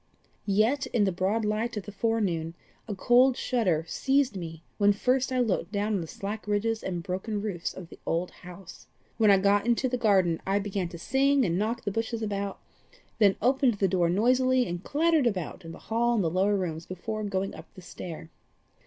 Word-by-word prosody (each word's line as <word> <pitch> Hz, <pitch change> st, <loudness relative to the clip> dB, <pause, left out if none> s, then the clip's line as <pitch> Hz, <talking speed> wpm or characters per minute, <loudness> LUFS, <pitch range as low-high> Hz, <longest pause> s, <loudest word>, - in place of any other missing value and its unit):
Yet, 220 Hz, +8 st, +2 dB
in 225 Hz, -, +1 dB
the 195 Hz, -, +2 dB
broad 195 Hz, +5 st, 0 dB
light 215 Hz, +2 st, -1 dB
of 205 Hz, -, -3 dB
the 205 Hz, -, -7 dB
forenoon, 195 Hz, -7 st, -1 dB, 0.3 s
a 210 Hz, -, -4 dB
cold 250 Hz, +5 st, +4 dB
shudder 185 Hz, -11 st, 0 dB
seized 270 Hz, +3 st, +1 dB
me 165 Hz, -3 st, -7 dB, 0.2 s
when 205 Hz, 0 st, +5 dB
first 255 Hz, +5 st, +1 dB
I 255 Hz, -, 0 dB
looked 220 Hz, -5 st, 0 dB
down 210 Hz, +1 st, -1 dB
on 195 Hz, -, 0 dB
the 165 Hz, -, -6 dB
slack 210 Hz, +5 st, -6 dB
ridges 220 Hz, +2 st, 0 dB
and 175 Hz, -3 st, -4 dB
broken 190 Hz, +3 st, -3 dB
roofs 195 Hz, -5 st, -3 dB
of 175 Hz, -3 st, -10 dB
the -, -, -13 dB
old 170 Hz, +2 st, -1 dB
house. 180 Hz, 0 st, -12 dB, 0.3 s
When 220 Hz, -2 st, +4 dB
I 200 Hz, -, +7 dB
got 200 Hz, +2 st, +2 dB
into 240 Hz, +2 st, +2 dB
the 250 Hz, 0 st, -2 dB
garden 190 Hz, -7 st, +3 dB
I 195 Hz, +1 st, +1 dB
began 195 Hz, -3 st, -2 dB
to 170 Hz, -, -9 dB
sing 270 Hz, +7 st, +2 dB
and 170 Hz, -, 0 dB
knock 230 Hz, +3 st, -1 dB
the 205 Hz, -, -2 dB
bushes 225 Hz, +2 st, -2 dB
about, 200 Hz, -2 st, -3 dB, 0.6 s
then 200 Hz, -3 st, +5 dB
opened 260 Hz, -1 st, +3 dB
the 195 Hz, -1 st, +1 dB
door 175 Hz, -2 st, +1 dB
noisily, 255 Hz, +6 st, +3 dB
and 175 Hz, 0 st, -5 dB
clattered 315 Hz, -2 st, +2 dB
about 185 Hz, -8 st, -3 dB
in 165 Hz, -, -8 dB
the 165 Hz, -, -10 dB
hall 235 Hz, +2 st, 0 dB
and 210 Hz, -, +1 dB
the 165 Hz, -, 0 dB
lower 195 Hz, +4 st, +2 dB
rooms 165 Hz, -3 st, -4 dB
before 215 Hz, +4 st, -5 dB
going 195 Hz, -1 st, -2 dB
up -, -, -12 dB
the 185 Hz, -, -11 dB
stair. 165 Hz, -2 st, -8 dB
205 Hz, 205 wpm, -28 LUFS, 185-235 Hz, 0.6 s, I